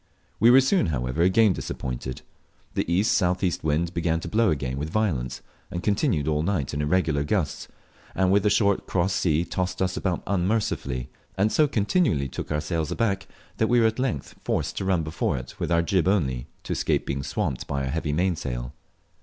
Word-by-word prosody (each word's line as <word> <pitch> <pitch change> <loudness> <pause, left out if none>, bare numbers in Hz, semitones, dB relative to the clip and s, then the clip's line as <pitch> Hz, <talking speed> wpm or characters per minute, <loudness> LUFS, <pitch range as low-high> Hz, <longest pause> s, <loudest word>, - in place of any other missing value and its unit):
We 115 - +6
were 130 +2 +8
soon, 135 - +2
however, 65 0 -1
again 95 +3 +5
disappointed. 65 -4 -5 0.5
The - - -1
E.S.E. 90 -1 +2
wind 80 +3 0
began 80 -1 0
to - - -6
blow 110 0 +2
again 70 -3 -2
with 75 +2 -3
violence, 75 - -1 0.3
and 85 - -5
continued 100 - +1
all 75 -1 +1
night 85 -5 -1
in 75 - -1
irregular 75 -2 +1
gusts, 80 -1 -1 0.5
and 95 -1 +2
with 100 0 +4
a 105 - +4
short 100 -1 +2
cross 95 +1 +1
sea 85 -2 +1
tossed 90 +1 -2
us 95 -1 0
about 90 -3 -1
unmercifully, 90 - -1 0.3
and 105 +3 +2
so 155 - +4
continually 105 - +1
took - - -6
our 75 0 0
sails 80 0 -2
aback, 100 -4 -1 0.3
that 110 - +2
we 120 +1 +4
were 115 - +4
at 110 +2 +1
length 125 - -2
forced - - -1
to - - -2
run 95 -4 +2
before 80 -4 -1
it 60 0 -9
with - - -2
our 85 0 +3
jib 90 +1 +1
only, 65 -11 +1 0.2
to - - -3
escape - - 0
being 70 0 -2
swamped 65 -1 -3
by 70 -1 -2
our 65 - -2
heavy 80 0 -1
mainsail. 75 -7 -1
85 Hz, 190 wpm, -25 LUFS, 75-100 Hz, 0.5 s, were